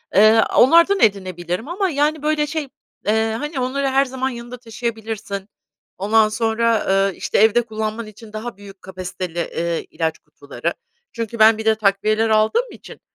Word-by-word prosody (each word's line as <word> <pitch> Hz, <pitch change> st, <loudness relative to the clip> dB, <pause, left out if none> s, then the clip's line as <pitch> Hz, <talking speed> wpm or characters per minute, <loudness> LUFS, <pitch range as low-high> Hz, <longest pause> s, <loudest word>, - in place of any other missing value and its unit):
eee, 215 Hz, +2 st, +6 dB, 0.2 s
onlardan 335 Hz, +8 st, +6 dB
edinebilirim 185 Hz, -, 0 dB
ama, 380 Hz, +2 st, -1 dB
yani, 300 Hz, 0 st, 0 dB
böyle, 300 Hz, -1 st, +1 dB
şey, 310 Hz, -2 st, -3 dB, 0.4 s
eee, 220 Hz, +1 st, +1 dB
hani, 295 Hz, -2 st, -4 dB
onları 270 Hz, +2 st, -1 dB
her 270 Hz, +1 st, +3 dB
zaman 260 Hz, 0 st, -3 dB
yanında 240 Hz, 0 st, -8 dB
taşıyabilirsin, 220 Hz, -3 st, -5 dB, 0.5 s
ondan 215 Hz, +2 st, +3 dB
sonra, 225 Hz, 0 st, +1 dB
eee, 195 Hz, -1 st, +2 dB
işte, -, -, -1 dB
evde 220 Hz, +3 st, +5 dB
kullanman 220 Hz, 0 st, -4 dB
için 215 Hz, +1 st, -14 dB
daha 220 Hz, -1 st, -6 dB
büyük 200 Hz, -1 st, -13 dB
kapasiteli, 185 Hz, -2 st, -6 dB
eee, 170 Hz, 0 st, -2 dB
ilaç 160 Hz, -1 st, -2 dB
kutuları. -, -, -6 dB, 0.4 s
Çünkü 230 Hz, 0 st, -5 dB
ben 220 Hz, 0 st, +7 dB
bir 220 Hz, -, -6 dB
de 220 Hz, 0 st, +4 dB
takviyeler 215 Hz, +2 st, +1 dB
aldığım 220 Hz, -, +2 dB
için -, -, -13 dB
220 Hz, 155 wpm, -20 LUFS, 205-255 Hz, 0.5 s, ben